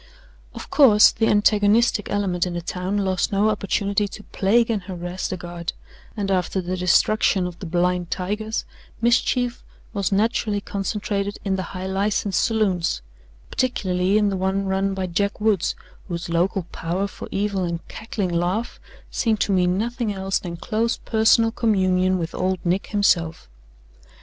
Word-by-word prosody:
Of - - -9
course, 225 -8 +7
the 225 0 0
antagonistic 210 +1 +3
element 185 -3 0
in 175 - -4
the 175 - -2
town 185 +3 -2
lost 190 -2 0
no 205 +2 +3
opportunity 200 0 0
to 210 +1 -10
plague 230 +5 +2
and 215 -3 -1
harass 180 -1 -5
the 185 - -4
Guard, 175 0 -5 0.4
and 200 -2 -1
after 185 0 0
the 185 0 -2
destruction 185 +2 +3
of 180 -1 -6
the 185 - -6
"blind 175 +1 0
tigers," 210 +4 -2 0.3
mischief 240 +1 +1 0.3
was 200 -3 -1
naturally 210 0 +1
concentrated 200 0 -3
in 195 -1 +1
the 190 - -2 0.2
high 185 - -4
license 195 0 0
saloons 190 - +1 0.5
particularly 190 -6 +1
in 210 -1 +3
the 195 - -2
one 190 +1 0
run 195 0 0
by 190 -1 -2
Jack 200 +3 -1
Woods, 210 -5 +1 0.3
whose 170 -2 -4
local 175 +3 +1
power 175 +4 -2
for - - -9
evil 200 -1 -1
and 170 -1 -4
cackling 215 -4 -4
laugh 180 +7 -1 0.3
seemed 220 -3 +1
to - - +1
mean 180 -1 +2
nothing 235 +1 -1
else 195 -1 -1
than 170 -2 -6
close 230 +5 -1
personal 225 0 +3
communion 185 -5 +2
with 165 -2 -4
old 185 0 0
Nick 180 +3 0
himself. 170 -6 +1
195 Hz, 155 wpm, -23 LUFS, 180-210 Hz, 0.5 s, course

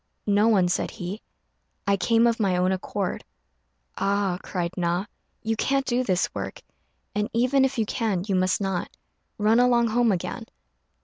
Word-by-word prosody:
"No 205 +1 +3
one," 195 -6 +4
said 180 - 0
he; 200 +1 -6 0.6
"I 200 -1 +3
came 225 +5 +3
of 235 -1 +2
my 190 -4 +2
own 180 +1 +2
accord." 190 0 -3 0.7
"Ah," 195 -2 0
cried 175 -2 -3
Na, 175 +2 0 0.4
"you 225 0 0
can't 275 +4 0
do 250 0 +1
this 185 -6 +1
work; - - -5 0.5
and 210 +2 -1
even 255 +4 +3
if 265 -1 0
you 225 - +1
can 210 -6 -1
you 205 - -1
must 185 0 +2
not. 195 -3 -2 0.5
Run 220 +2 +3
along 240 -1 +4
home 235 0 +3
again." 180 -3 -3
205 Hz, 165 wpm, -25 LUFS, 185-230 Hz, 0.7 s, one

